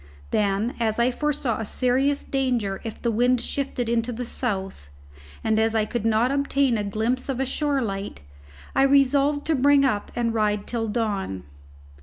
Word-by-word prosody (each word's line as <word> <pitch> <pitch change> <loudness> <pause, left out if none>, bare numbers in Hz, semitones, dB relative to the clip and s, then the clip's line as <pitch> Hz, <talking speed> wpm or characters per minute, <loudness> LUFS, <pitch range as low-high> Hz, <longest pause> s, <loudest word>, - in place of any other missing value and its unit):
Then, 205 +3 +1
as 220 -2 0
I 240 +2 +3
foresaw 285 -4 -1
a 225 - -3
serious 265 +4 +1
danger 245 -8 -1
if 225 - -6
the 235 - 0
wind 245 +3 +2
shifted 260 -2 -3
into 230 +1 0
the 245 +1 -4
south, 195 - -4 0.5
and 220 -1 +2
as 225 0 +1
I 215 -1 +2
could 225 0 -2
not 225 +3 +2
obtain 280 -2 +1
a 210 - -1
glimpse 220 +6 -2
of 265 -2 -2
a 270 - +1
shore 280 0 0
light, 195 - -5 0.5
I - - +4
resolved 280 +1 +3
to 320 - +1
bring 280 0 +4
up 210 -6 -1
and 235 -1 0
ride 210 -2 0
till 230 -2 -2
dawn. 205 - -2
235 Hz, 175 wpm, -24 LUFS, 215-270 Hz, 0.5 s, I